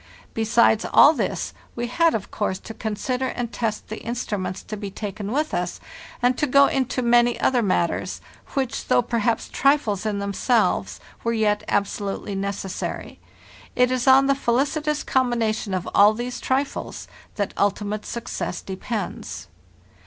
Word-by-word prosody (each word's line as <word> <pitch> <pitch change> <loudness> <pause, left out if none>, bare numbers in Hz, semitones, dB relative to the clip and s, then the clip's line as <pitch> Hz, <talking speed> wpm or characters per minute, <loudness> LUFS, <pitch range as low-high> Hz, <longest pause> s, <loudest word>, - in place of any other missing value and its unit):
Besides 225 0 +3
all 295 - +8
this, - - -2 0.2
we 240 - -2
had, 330 +7 +2
of 210 - -4
course, 205 -3 -1
to 225 - -9
consider 235 +4 -2
and 240 -2 -4
test 220 -3 -3
the 220 - -6
instruments 205 -6 -3
to 215 - -6
be 205 -1 -5
taken 205 0 -5
with 300 +4 0
us, 175 0 -2 0.4
and 250 +1 +4
to 300 - +2
go 280 +2 +6
into 260 -2 0
many 240 0 +4
other 250 -2 +2
matters, 185 -5 0 0.4
which, 265 -3 -2
though - - +4
perhaps 235 -1 0
trifles 275 -9 +2
in 215 -2 -1
themselves, 200 +3 +1 0.2
were 230 - 0
yet 210 -2 +1
absolutely 200 0 -2
neces 195 -1 -3
sary. - - -5 0.6
It 250 0 +3
is 255 0 -1
on 265 +1 +7
the 275 - +4
felicitous 285 +4 0
combination 230 -5 0
of 185 -2 -2
all 205 +2 +6
these 245 +2 -4
trifles 270 +2 -2 0.3
that 205 -2 -2
ultimate 205 +1 -1
success 235 - -4
depends. 195 +3 -5
230 Hz, 150 wpm, -23 LUFS, 205-255 Hz, 0.6 s, all